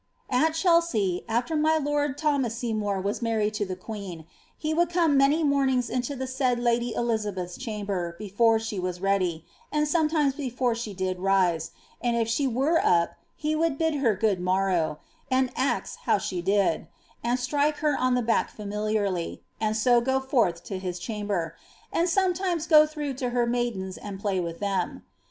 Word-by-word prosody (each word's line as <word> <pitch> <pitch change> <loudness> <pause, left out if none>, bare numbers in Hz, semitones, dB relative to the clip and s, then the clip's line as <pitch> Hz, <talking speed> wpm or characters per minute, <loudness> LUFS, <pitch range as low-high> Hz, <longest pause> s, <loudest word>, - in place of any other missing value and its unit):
^^ - - +2
At 315 +5 +3
Chelsea, 325 - +2
after 240 +8 0
my 310 +1 +3
lord 290 -2 0
Thomas 280 -7 0
Seymour 215 -4 -1
was 200 +4 -2
married 220 -2 0
to 210 -1 -2
the 185 - -3
queen, 185 -5 -7 0.3
he 310 0 -2
would 340 +1 +2
come 335 -4 +2
many 280 +4 +4
mornings 270 -4 +2
into 255 +3 -2
the 260 0 -3
said 260 -1 0
lady 240 0 +1
Eliabeth^ 205 -6 -2
chamber 200 -7 -3
before 225 +2 +2
she 220 -3 -4
were 180 0 -2
ready, 180 -3 0 0.3
and 300 0 +1
sometimes 305 -3 +2
before 255 -3 -1
she 225 -3 -5
did 185 -1 -2
rise, 185 -4 +2 0.3
end 240 -1 +1
if 230 -1 +1
she 250 +5 +1
were 270 +7 +2
up 170 -1 +3 0.2
he 310 0 -1
would 320 -2 +1
bid 320 0 +1
her 260 -7 +2
good 205 -2 +1
morrow, 185 -4 +1 0.3
and 260 -1 +2
ax 260 +2 -1
how - - +4
she 180 -2 -3
didt 195 -2 +1 0.4
and 240 +2 +1
strike 290 +4 +1
her 300 -2 +1
on 255 0 +2
the 250 - +1
back 225 0 +1
familiarly, 210 -3 -2 0.2
and 220 0 0
so 240 +2 +4
go 265 +2 +1
forth 235 -11 +1
to 190 +2 -5
his 180 -1 -4
chamber, 200 -4 -3 0.4
and 345 +2 +2
sometimes 360 -2 +1
go 305 -2 +7
through 300 -2 -4
to 255 0 -3
Iter 245 0 +1
maidens 235 -6 -2
and 200 -2 -7
play 200 -2 0
with 170 -1 -4
them. 200 -2 -2
235 Hz, 180 wpm, -26 LUFS, 195-280 Hz, 0.4 s, go